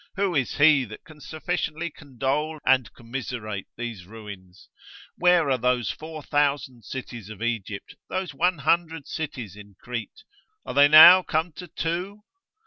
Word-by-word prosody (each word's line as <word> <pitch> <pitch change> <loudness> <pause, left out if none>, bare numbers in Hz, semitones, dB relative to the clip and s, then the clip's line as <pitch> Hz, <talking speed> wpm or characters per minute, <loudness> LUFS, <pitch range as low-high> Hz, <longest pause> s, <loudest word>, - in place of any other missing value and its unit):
Who 195 -1 0
is 135 -6 -1
he 145 -2 +5
that 110 -1 -11
can 155 -4 -16
sufficiently 160 +1 -3
condole 145 +3 -3
and 130 -2 +3
commiserate 115 -4 -6
these 115 -7 -6
ruins? 100 -4 -12 0.5
Where 175 -5 +3
are 130 - +1
those 120 -4 +1
4000 145 -5 -2
cities 120 -3 -8
of 110 0 -8
Egypt, 110 -4 -4 0.2
those 185 -4 -3
100 165 -1 0
cities 125 - -6
in 105 -1 -14
Crete? 115 -4 -7 0.4
Are - - -5
they 140 0 +6
now 160 +5 +10
come 165 0 -1
to 165 +4 -10
two? 180 +6 -4
140 Hz, 135 wpm, -25 LUFS, 115-160 Hz, 0.5 s, now